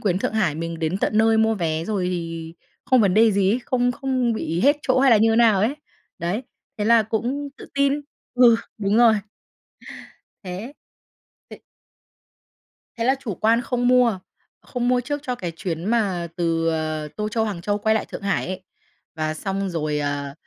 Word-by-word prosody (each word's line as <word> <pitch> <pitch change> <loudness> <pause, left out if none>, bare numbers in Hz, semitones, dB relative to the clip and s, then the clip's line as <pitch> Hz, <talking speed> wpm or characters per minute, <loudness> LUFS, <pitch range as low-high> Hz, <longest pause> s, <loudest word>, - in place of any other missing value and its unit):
Quyến 185 -3 0
Thượng - - -2
Hải 190 -9 +1
mình 165 +1 -5
đến 165 +4 -1
tận 215 - 0
nơi 225 0 +4
mua 220 0 +3
vé 165 -4 -2
rồi 195 -3 -1
thì 165 -2 -5 0.3
không 255 -1 +4
vấn 195 -4 +3
đề 220 +1 +5
gì 195 -1 +2
ấy, 240 - +1
không 245 -1 +1
không 255 -2 -1
bị 170 -6 -2
hết 285 +5 +4
chỗ 255 0 +2
hay 270 -1 +5
là 225 - +7
như 225 +1 +3
nào 225 -5 +4
ấy. 235 +7 +1 0.4
Đấy, 180 +9 -2 0.4
thế 205 - -1
là 230 +1 +5
cũng 245 +7 -2
tự - - -11
tin. 280 0 +3 0.4
Ừ, 245 -2 +6 0.2
đúng 200 0 +1
rồi. 230 -1 +6 1.3
Thế 195 +9 -7 0.8
ê - - -11 1.4
thế 230 - -2
là 260 +3 +3
chủ 215 -9 -5
quan 230 +2 +2
không 245 0 -1
mua. 245 -5 +4 0.4
Không 245 -1 -3
mua 250 0 +2
trước 290 +4 -3
cho 250 -3 -2
cái 175 -6 -5
chuyến 170 -1 -4
mà 200 -7 0
từ, 165 -1 0
ờ, 155 -1 -2
Tô 210 0 -2
Châu, 220 +1 0
Hàng 195 -6 -4
Châu 205 +2 -1
quay 220 +1 +1
lại 220 - -1
Thượng - - -8
Hải 200 -1 -1
ấy. 185 0 -5 0.5
Và 155 0 -2
xong 195 +4 -3
rồi, 155 -3 -2
ờ, 145 -1 -3
210 Hz, 190 wpm, -22 LUFS, 170-235 Hz, 1.4 s, là